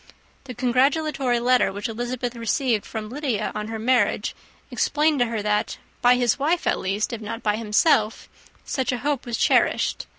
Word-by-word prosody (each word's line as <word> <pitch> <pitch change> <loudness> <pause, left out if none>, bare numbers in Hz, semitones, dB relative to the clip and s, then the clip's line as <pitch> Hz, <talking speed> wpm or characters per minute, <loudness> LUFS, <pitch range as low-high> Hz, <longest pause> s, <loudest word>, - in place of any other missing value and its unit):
The 250 -2 -8
congratulatory 260 +1 +1
letter 250 +1 +3
which 205 +4 -4
Elizabeth 240 +2 -4
received 230 -1 0
from 220 -1 -5
Lydia 250 -5 -2
on 210 0 -4
her 225 0 -4
marriage 245 +3 +1 0.4
explained 300 -1 +1
to 245 - +3
her 225 -2 -3
that, 210 0 0 0.2
by 245 +1 +6
his 245 0 +1
wife 325 +5 0
at - - +1
least, 200 +5 -2
if 230 - -5
not 225 +2 -6
by 210 -1 +1
himself, 220 +1 +1 0.4
such 260 -3 -1
a 250 - -1
hope 290 -4 -1
was 235 -2 -2
cherished. - - +1
240 Hz, 170 wpm, -23 LUFS, 220-260 Hz, 0.4 s, by